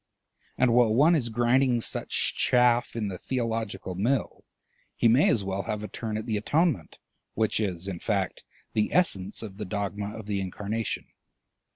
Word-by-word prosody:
And 125 Hz, -2 st, +3 dB
while 120 Hz, -2 st, +5 dB
one 145 Hz, +9 st, +5 dB
is 130 Hz, -8 st, +1 dB
grinding 120 Hz, +2 st, +2 dB
such -, -, 0 dB
chaff 125 Hz, -1 st, +3 dB
in 110 Hz, -3 st, -1 dB
the 95 Hz, -3 st, -5 dB
theological 115 Hz, -6 st, -3 dB
mill, 115 Hz, +7 st, -1 dB, 0.5 s
he 120 Hz, -, +3 dB
may 120 Hz, +6 st, +5 dB
as 110 Hz, -, +2 dB
well 95 Hz, 0 st, -2 dB
have 105 Hz, -1 st, -2 dB
a -, -, -4 dB
turn 110 Hz, +2 st, -4 dB
at 110 Hz, -, -5 dB
the 110 Hz, -3 st, -1 dB
Atonement, 145 Hz, -, 0 dB, 0.4 s
which 110 Hz, 0 st, +1 dB
is, 95 Hz, -4 st, -1 dB
in 90 Hz, -3 st, -4 dB
fact, 100 Hz, -2 st, -2 dB, 0.3 s
the 105 Hz, -1 st, +1 dB
essence 100 Hz, -, +1 dB
of 100 Hz, -3 st, -8 dB
the 105 Hz, -, -4 dB
dogma 100 Hz, +1 st, -4 dB
of 110 Hz, -, -8 dB
the 100 Hz, -2 st, -2 dB
Incarnation. 105 Hz, +4 st, -3 dB
110 Hz, 170 wpm, -27 LUFS, 100-120 Hz, 0.5 s, while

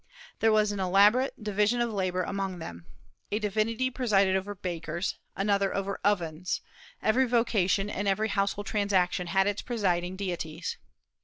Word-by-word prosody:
There 225 Hz, -, +4 dB
was 215 Hz, -1 st, +3 dB
an 205 Hz, -, -4 dB
elaborate 205 Hz, +7 st, +3 dB
"division 210 Hz, +3 st, +1 dB
of 235 Hz, -2 st, 0 dB
labor" 185 Hz, -2 st, 0 dB
among 195 Hz, -1 st, -3 dB
them. 85 Hz, -, -9 dB, 0.4 s
A 210 Hz, -, +1 dB
divinity 220 Hz, +4 st, 0 dB
presided 200 Hz, -7 st, +2 dB
over 195 Hz, +2 st, -2 dB
bakers, 170 Hz, -1 st, -3 dB, 0.2 s
another 200 Hz, 0 st, +1 dB
over 195 Hz, 0 st, -2 dB
ovens, 180 Hz, -3 st, 0 dB, 0.4 s
every 255 Hz, +4 st, +3 dB
vocation 210 Hz, -5 st, +2 dB
and 205 Hz, 0 st, -3 dB
every 210 Hz, +3 st, +1 dB
household 200 Hz, 0 st, 0 dB
transaction 190 Hz, -4 st, +1 dB
had 195 Hz, +2 st, +2 dB
its 205 Hz, 0 st, -1 dB
presiding 185 Hz, -6 st, -1 dB
deities. 175 Hz, -5 st, -4 dB
200 Hz, 145 wpm, -28 LUFS, 185-215 Hz, 0.4 s, There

